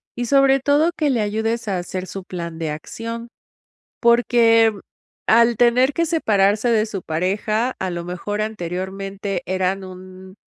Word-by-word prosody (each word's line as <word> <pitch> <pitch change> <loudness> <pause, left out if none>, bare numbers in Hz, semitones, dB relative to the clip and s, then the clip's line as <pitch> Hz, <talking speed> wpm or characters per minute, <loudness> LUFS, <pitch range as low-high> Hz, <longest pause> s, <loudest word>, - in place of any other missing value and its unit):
y 245 - -2
sobre 275 +1 +4
todo, 290 +5 +2
que 300 -2 +1
le 245 -5 +1
ayudes 220 +2 -2
a 190 - 0
hacer 185 +1 -5
su 195 0 -8
plan 170 -3 -6
de 160 -2 -2
acción, 230 +9 -7 0.7
porque, 235 -1 +4
mm, 205 - -11 0.5
al 235 +1 +5
tener 250 +3 +4
que 335 - +1
separarse 215 - +2
de 220 -2 +3
su 200 -4 -5
pareja, 205 +9 -1
a 190 - -2
lo 175 -1 -4
mejor 180 +4 -4
anteriormente 195 -1 -4
eran 190 +1 -1
un 185 0 -11
210 Hz, 155 wpm, -21 LUFS, 185-235 Hz, 0.7 s, al